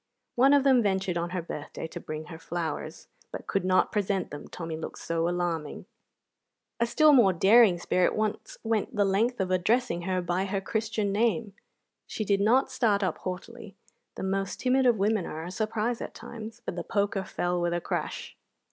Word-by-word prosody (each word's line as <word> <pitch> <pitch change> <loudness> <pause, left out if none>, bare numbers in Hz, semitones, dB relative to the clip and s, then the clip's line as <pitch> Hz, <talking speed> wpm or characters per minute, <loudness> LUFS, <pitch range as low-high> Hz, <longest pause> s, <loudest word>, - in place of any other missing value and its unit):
One 270 +4 +5
of 280 - +4
them 265 -3 +5
ventured 190 -3 0
on 170 0 -1
her 180 -1 -3
birthday 150 -1 -6
to - - -7
bring 155 0 -6
her 160 0 -10
flowers, 165 -2 -5 0.2
but - - -7
could 195 - -1
not 185 0 +3
present 200 -2 -1
them, 145 0 -8
Tommy 165 -2 -6
looked 160 - -6
so 165 0 -1
alarming. 175 -3 -3 0.9
A 235 - +2
still 305 +5 +5
more 225 -8 +6
daring 200 +1 +6
spirit 180 +1 +1
once 215 0 -2
went 225 0 -1
the 205 -1 +3
length 220 +5 +1
of 185 -1 -1
addressing 185 +1 +1
her 185 0 +1
by 175 +2 -1
her 195 0 -1
Christian 215 0 -1
name. 220 0 0 0.5
She 215 - -4
did 200 0 +2
not 255 +6 +3
start 215 -6 +2
up 185 -4 -1
haughtily 195 +3 -7 0.4
(the - - -6
most 195 0 -2
timid 260 0 +3
of 235 -2 +4
women 205 -1 +1
are 160 +1 -5
a 175 - -6
surprise 220 +3 -1
at - - -6
times), 225 0 -9
but - - -4
the 175 - -4
poker 200 0 0
fell 175 -1 -2
with 175 0 0
a 175 - 0
crash. - - -4
195 Hz, 190 wpm, -28 LUFS, 175-225 Hz, 0.9 s, more